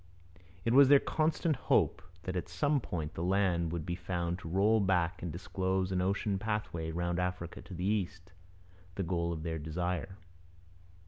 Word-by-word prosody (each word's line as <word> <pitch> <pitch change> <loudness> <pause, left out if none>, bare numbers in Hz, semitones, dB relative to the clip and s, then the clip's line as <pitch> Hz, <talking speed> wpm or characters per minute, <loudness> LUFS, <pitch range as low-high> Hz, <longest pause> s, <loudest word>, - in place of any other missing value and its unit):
It 115 - +2
was 140 +1 +8
their 145 - +9
constant 155 +1 +1
hope - - +2 0.2
that 90 +1 -4
at 90 -2 -3
some 140 - +1
point 80 -7 -4
the - - -5
land 90 -3 +2
would 85 -3 -3
be 85 - -2
found 85 0 -2
to 85 - -7
roll 100 +5 +4
back 90 -3 +1
and 85 - -3
disclose 95 +2 -1
an 90 -1 +1
ocean 100 +1 0
pathway 105 -6 -2
round 85 +1 -1
Africa 90 -1 -3
to - - -11
the 90 +2 -3
East, 95 -3 -1 0.6
the 95 - -1
goal 85 -1 -1
of 80 -2 -4
their 80 -1 -2
desire. 90 +5 -3
90 Hz, 175 wpm, -32 LUFS, 85-100 Hz, 0.6 s, their